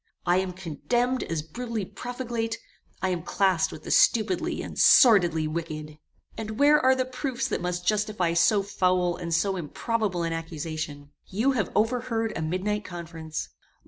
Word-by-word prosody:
I 175 +1 +3
am 185 -1 -1
condemned 240 - -1
as 160 -2 -3
brutally 225 +5 -4
profligate: 240 0 -4 0.5
I 190 - +2
am 180 -2 -1
classed 185 0 +1
with 155 - -10
the - - -5
stupidly 210 -6 +2
and - - -7
sordidly 175 -10 +6
wicked. 155 -1 -5 0.4
"And 220 -1 -5
where 295 +1 +6
are 260 +1 +5
the 260 0 0
proofs 255 -1 -3
that - - -2
must 180 0 -3
justify 210 -4 +1
so 195 +4 +3
foul 180 -2 +1
and 170 -1 -6
so 190 +4 +1
improbable 185 +2 -2
an 165 0 -1
accusation? 155 -3 -5 0.2
You 225 +8 +1
have 245 -6 -1
overheard 225 0 0
a - - -3
midnight 190 +6 -1
conference. 165 -3 -6
185 Hz, 155 wpm, -26 LUFS, 165-225 Hz, 0.5 s, sordidly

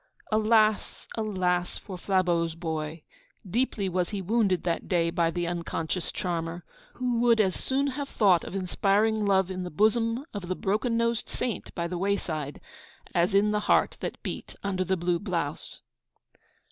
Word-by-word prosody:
Alas, 215 0 +2
alas! 185 -5 0
for 190 - -8
Flabeau's 175 -3 +1
boy! 160 -1 -4 0.4
Deeply 215 -1 0
was 180 -1 0
he 205 - -3
wounded 195 -1 +1
that 170 -1 -1
day 170 -2 +2
by 170 -1 +2
the 175 +1 -2
unconscious 170 0 -2
charmer, 170 -1 -3 0.3
who 245 -2 0
would 235 -1 +4
as 190 -4 +3
soon 270 +8 0
have 280 0 -3
thought 190 -6 +4
of - - -7
inspiring 205 +3 +2
love 190 -1 +3
in 185 0 -4
the 180 - -4
bosom 230 - +2
of 200 -4 -5
the 185 - -1
broken 215 +6 0
nosed 230 -1 0
saint 240 - -3
by 170 -1 -1
the 175 0 -4
wayside 160 -7 -2 0.5
as 175 +3 +2
in 210 +1 +4
the 210 - +1
heart - - +4
that - - -5
beat - - -6
under 190 -2 0
the 190 0 0
blue 175 0 0
blouse. 170 -7 -3
190 Hz, 160 wpm, -28 LUFS, 175-215 Hz, 0.5 s, would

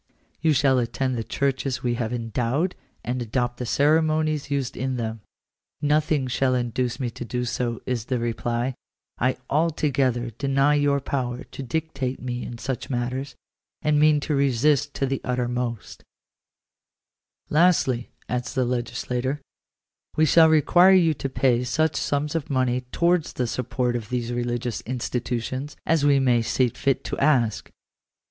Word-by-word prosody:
You 160 0 +3
shall 135 -2 +3
attend 130 +2 -1
the 115 - -2
churches 135 0 -1
we 120 -1 +1
have 120 -1 -2
endowed, 120 - -1 0.3
and 125 +1 -2
adopt 120 +1 -1
the 125 - -4
ceremonies 155 +1 +2
used 140 -3 -2
in 130 +1 -2
them." 110 -2 -4 0.3
" - - -64 0.3
Nothing 150 -1 +2
shall 130 +1 +1
induce 125 +1 -1
me 125 -3 -2
to 120 - -7
do 125 +1 -3
so," 120 -1 -2
is 120 -4 -2
the 125 - -1
reply; 120 +2 -1 0.2
" - - -64
I 130 +1 +1
altogether 135 -6 +1
deny 135 +5 +2
your 145 -1 +2
power 125 -3 -3
to - - -9
dictate 135 -1 -3
to - - -14
me 125 -1 -3
in 120 - -7
such 125 +1 -4
matters, 130 +2 -3 0.5
and 150 -1 +3
mean 150 0 +5
to 150 - -2
resist 140 +1 +2
to 135 - 0
the 135 0 -2
uttermost." 125 -2 -3 1.5
"Lastly," 150 -7 +3 0.2
adds 125 -1 -3
the 130 -1 +2
legislator, 125 +2 -2 0.8
"we 155 - +4
shall 160 +1 +6
require 175 +5 +6
you 165 -4 +4
to 135 -1 -4
pay 125 -2 +2
such 155 +6 +1
sums 145 +2 -1
of 165 -3 -3
money 130 -2 +1
towards 170 -1 +1
the 125 - -1
support 125 +1 -1
of 115 -3 -4
these 120 -1 -2
religious 120 0 -2
institutions, 125 +2 -3
as 160 -3 +2
we 140 -1 +5
may 125 -3 +3
see 125 +2 +1
fit 135 +3 -1
to - - -3
ask." 130 -7 +2
130 Hz, 155 wpm, -24 LUFS, 120-145 Hz, 1.5 s, shall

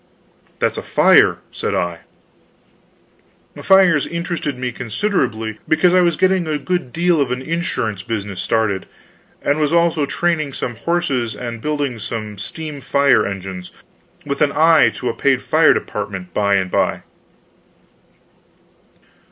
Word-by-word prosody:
"That's - - -1
a - - -5
fire," - - +4
said - - -3
I. 85 -1 -2 1.6
Fires 185 -6 +4
interested 170 -5 -3
me 125 0 -3
considerably, 115 - -2
because 175 +3 +3
I 185 - +5
was 170 -2 +2
getting 185 -1 +2
a 155 -1 0
good 175 -5 -3
deal 170 0 +2
of 130 -3 0
an 125 +1 -3
insurance 125 - -2
business 100 -4 -4
started, 110 -4 0 0.6
and 145 +2 +1
was 150 -1 +1
also 170 -3 +2
training 155 -3 -1
some 120 - -4
horses 135 -4 -1
and 115 -2 -6
building 145 -5 -2
some 105 -1 -6
steam 150 +4 -7
fire 140 -6 +3
engines, 95 -2 -6 0.6
with 140 0 -3
an 145 -2 +3
eye 160 +1 +5
to - - -5
a - - 0
paid - - +1
fire - - +4
department 95 -3 -5
by 100 -1 +2
and 95 -2 -1
by. - - 0
140 Hz, 135 wpm, -19 LUFS, 110-165 Hz, 1.6 s, I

